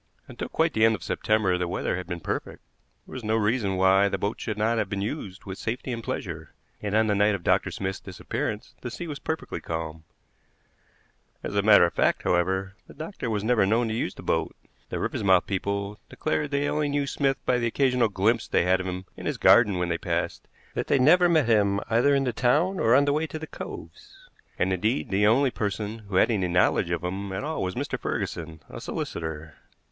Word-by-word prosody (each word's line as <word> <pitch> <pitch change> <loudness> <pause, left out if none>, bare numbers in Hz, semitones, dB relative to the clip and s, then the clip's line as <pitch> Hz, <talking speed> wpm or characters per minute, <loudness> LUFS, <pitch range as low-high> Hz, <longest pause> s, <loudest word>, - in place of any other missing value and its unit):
Until - - -6
quite - - +1
the 110 - +2
end 110 0 +5
of 90 - -10
September 105 -4 +1
the 90 - -1
weather 90 - -1
had 90 0 -5
been 90 -2 -5
perfect; - - -4 0.4
there - - -13
was 130 - -6
no 110 +1 +1
reason 105 -3 +1
why 95 +2 +4
the - - -1
boat 100 +2 -3
should 110 -2 -3
not 110 +2 +1
have 105 -3 -1
been 100 -1 -2
used 105 -5 -5
with 95 0 -7
safety 120 +3 -3
and 115 -1 -4
pleasure, 80 -8 -5 0.3
and 105 0 -2
on 110 0 +4
the 105 - +1
night 100 +1 +3
of 95 - -7
Dr. - - +2
Smith's 95 0 -4
disappearance 95 -2 -5
the 125 - -4
sea 120 +9 -6
was 150 -4 -6
perfectly 160 0 -4
calm. 80 -1 -5 1.4
As - - -4
a 100 - +3
matter 100 -2 +7
of 85 - -2
fact, - - +1
however, 95 +2 0
the - - -14
doctor 155 - -5
was 105 -2 -1
never 115 -2 +3
known 115 +4 +2
to - - -2
use 110 -5 -2
the - - -10
boat. - - -1 0.3
The - - -3
Riversmouth 95 -3 +2
people 100 +1 -3
declared 155 -1 -1
that 140 - 0
they 145 +1 0
only 150 0 0
knew 145 0 0
Smith 135 -1 0
by 125 - +2
the 120 - 0
occasional 125 -1 +2
glimpse 110 +4 +1
they - - +2
had 90 +1 +3
of 95 - -4
him 90 +1 -4
in - - -6
his - - -1
garden 105 -6 +5
when 90 -1 -1
they 85 0 -1
passed; - - -2 0.3
that - - -3
they - - +3
never 175 +7 +5
met 160 -5 +4
him 100 -3 +3
either 125 +5 +4
in 135 - +2
the 125 -3 -1
town 155 +12 +2
or 115 +2 +4
on 140 +2 +5
the 145 - +2
way 155 +2 0
to 160 - -6
the 160 - -6
coves; - - -10 0.3
and, 95 +1 +1
indeed, 110 +8 0
the 100 +2 +3
only 130 +4 +4
person 105 +1 -3
who 95 - -4
had 95 - +4
any 95 -5 +1
knowledge 90 0 +2
of 85 0 -2
him 95 +2 -4
at 95 - -3
all 155 +2 -3
was 90 -1 -2
Mr. - - -3
Ferguson, 80 -1 -4
a - - -9
solicitor. 80 -1 -5
105 Hz, 225 wpm, -26 LUFS, 95-125 Hz, 1.4 s, matter